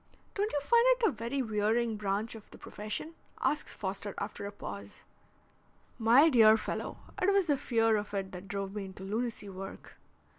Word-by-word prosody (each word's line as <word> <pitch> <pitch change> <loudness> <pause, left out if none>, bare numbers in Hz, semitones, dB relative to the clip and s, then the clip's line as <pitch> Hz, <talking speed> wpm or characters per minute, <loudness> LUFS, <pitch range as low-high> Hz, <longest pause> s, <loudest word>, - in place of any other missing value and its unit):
"Don't 415 +2 0
you 290 - +1
find 470 +10 +4
it - - -9
a - - +2
very 235 +3 -2
wearing 220 +1 +1
branch 210 +2 -1
of 220 -2 -12
the - - -13
profession?" 215 +10 -6 0.3
asks 300 - -1
Foster 200 0 -4
after 200 - -4
a - - -6
pause. 100 - -8 1.0
"My 240 +7 +7
dear 225 -7 +7
fellow, - - -4 0.2
it 375 +2 +4
was 395 -2 +3
the 295 -4 +3
fear 225 -4 +2
of 205 0 -4
it 195 -1 -2
that 180 +1 -8
drove 195 0 -4
me 205 -2 -4
into 190 0 -9
lunacy 220 +1 -3
work." 195 0 -9
220 Hz, 180 wpm, -31 LUFS, 200-250 Hz, 1.0 s, My